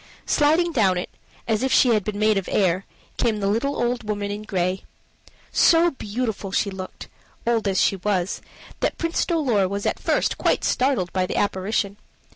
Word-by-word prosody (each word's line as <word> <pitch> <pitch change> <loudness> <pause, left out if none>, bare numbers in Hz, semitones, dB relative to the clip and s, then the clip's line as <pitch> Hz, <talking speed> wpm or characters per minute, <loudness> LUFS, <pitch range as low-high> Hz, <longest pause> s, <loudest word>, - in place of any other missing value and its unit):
Sliding 320 +3 +3
down 200 - +2
it, 180 - -4 0.4
as 220 -2 +1
if 265 0 0
she 255 - +5
had 215 -3 +3
been 210 0 -4
made 215 0 +3
of 195 -2 -2
air, 185 -1 +1 0.3
came 225 -3 +1
the 200 - -2
little 235 +8 0
old 240 0 0
woman 205 -1 -3
in 205 +1 -4
gray. 185 -3 -1 0.7
So 340 +1 +5
beautiful 220 -5 -4 0.2
looked 190 -1 -7
she - - -17 0.4
old 225 -3 +1
as 190 -1 +1
she 195 - +2
was 190 -1 -1 0.4
that - - -1
Prince 335 0 0
Dolor 255 - +2
was 200 +1 -3
at - - 0
first - - 0
quite - - +1
startled 250 -10 +1
by 185 -1 0
the - - -4
apparition. 200 +1 -1
210 Hz, 180 wpm, -23 LUFS, 195-245 Hz, 0.7 s, she